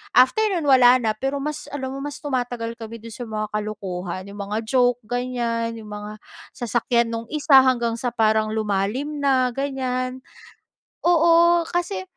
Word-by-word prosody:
after 255 +12 +5
no'n 360 -6 -1
wala 255 -3 +6
na. 230 -4 +1
Pero 270 +5 -3
mas 300 0 -5
alam 265 -2 -4
mo 275 - -6
mas 290 +2 -7
tumatagal 245 -4 -2
kami 225 0 -9
do'n 230 - -9
sa 240 +2 -7
mga 215 -1 -4
kalokohan. 190 -4 -4
'Yong 205 - -11
mga 210 +1 -2
joke 245 +1 +2
ganyan, 235 -1 -2
'yong 215 -2 -10
mga 210 0 -6 0.4
sasakyan 235 0 0
no'ng 230 0 -4
isa 285 -2 +5
hanggang 235 -3 +1
sa 245 -1 -3
parang 220 -1 +2
lumalim 220 +8 -1
na 260 -3 +2
ganyan. 255 -1 -3 0.8
Oo, 340 0 +5
kasi 345 - -2
245 Hz, 160 wpm, -23 LUFS, 220-270 Hz, 0.8 s, wala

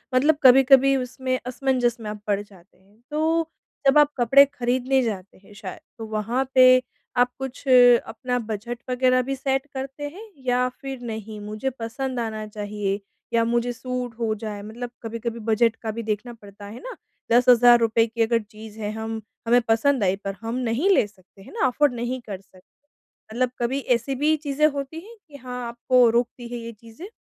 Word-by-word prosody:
मतलब 290 +3 +4
कभी-कभी 270 +1 +7
उसमें 255 0 -2
असमंजस 250 -1 0
में 215 -2 -6
आप 210 -1 -7
पड़ 200 -1 +1
जाते 195 -3 -18
हैं। 200 +4 -28
तो 320 +2 0 0.4
जब 275 - +5
आप 295 -1 +5
कपड़े 270 +3 +6
ख़रीदने 255 +1 +1
जाते 200 -4 -5
हैं 195 +2 -19
शायद 190 -2 -8 0.2
तो 225 - -6
वहाँ 220 +4 -1
पे 255 0 +7 0.4
आप 245 0 +3
कुछ 265 -1 -6
अपना 245 0 +4
बजट 225 +1 -5
वगैरह 255 0 +3
भी 270 +2 -3
सेट 270 +1 -1
करते 270 +2 -5
हैं? 420 +6 -12
या 250 0 +2
फिर 270 0 -8
नहीं, 220 -2 -6
मुझे 215 +5 -3
पसंद 255 +1 -5
आना 220 -2 -3
चाहिए 205 -1 -3 0.3
या 230 0 +3
मुझे 240 +1 0
सूट 250 0 -5
हो 225 -2 0
जाए 210 -2 -5
मतलब 235 +4 -7
कभी-कभी 230 +1 -5
बजट 225 +1 +2
का 225 -1 -5
भी 230 +2 -5
देखना 220 +3 -3
पडता 205 -2 -13
है 215 +4 -9
ना? - - -8 0.4
₹10,000 240 -2 +5
की 230 +1 -4
अगर 230 +1 +3
चीज़ 215 0 -13
है 210 -1 -3
हम 220 0 -5 0.3
हमें 245 +1 +5
पसंद 230 +2 +2
आई 190 0 +2
पर 195 0 -3
हम 225 +1 -4
नहीं 255 +9 0
ले 385 - +4
सकते 195 -1 -22
हैं - - -14
ना 445 - 0
अफ़ोर्ड 280 +1 +2
नहीं 245 +2 -3
कर 200 -5 -7
सकते, 185 -1 -22 0.7
मतलब 250 +1 0
कभी 245 +3 0 0.2
ऐसी 265 +4 -3
भी 300 +4 +2
चीजें 295 0 +1
होती 280 +1 -5
हैं 445 +7 -13
कि 290 - -15
हाँ, 250 -2 -6
आपको 240 +1 +3
रोकती 240 +1 -1
है 240 0 -6
ये 230 0 -7
चीजें? 230 - -12
240 Hz, 185 wpm, -24 LUFS, 220-260 Hz, 0.7 s, कभी-कभी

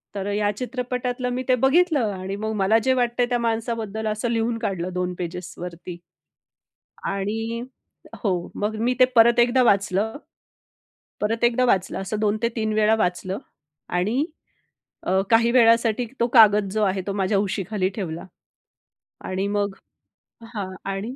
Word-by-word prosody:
तर 195 0 -3
ह्या 205 0 +1
चित्रपटातलं 250 0 -3
मी 255 +1 -2
ते 255 - +6
बघितलं 270 - +3
आणि 190 +1 -5
मग 220 +1 -3
मला 205 +4 +4
जे 260 - +3
वाटतं 245 -1 0
आहे 240 - -1
त्या 245 - +1
माणसाबद्दल, 225 -2 -2
असं 215 +2 -1
लिहून 230 0 0
काढलं 185 -5 -3
2 180 0 -2
पेजेसवरती. 175 0 -6 1.1
आणि 225 +4 -2 0.6
हो 205 - +1 0.2
मग 210 +1 -2
मी 245 +2 +1
ते - - +9
परत 235 +1 +6
एकदा 245 +2 +4
वाचलं 200 +2 +1 1.1
परत 225 +3 -1
एकदा 245 +1 +3
वाचलं. 190 -6 +1
असं 210 +3 -3
2 215 0 +1
ते 230 - +3
3 220 -1 -1
वेळा 215 +1 +3
वाचलं. 185 -1 -1 0.5
आणि 215 - 0 0.8
अ, 190 +1 +2
काही 230 +1 +4
वेळासाठी 230 -1 +4
तो 235 - +3
कागद 210 -4 +6
जो 215 -1 +1
आहे, 190 -1 +1
तो 200 - -1
माझ्या 195 0 +1
उशीखाली 195 -1 -1
ठेवला. 170 -4 -5 1.0
आणि 190 +1 -2
मग 205 -1 -1 0.8
हां 200 -2 -3 0.2
आणि 215 +7 -4
215 Hz, 150 wpm, -23 LUFS, 195-235 Hz, 1.1 s, ते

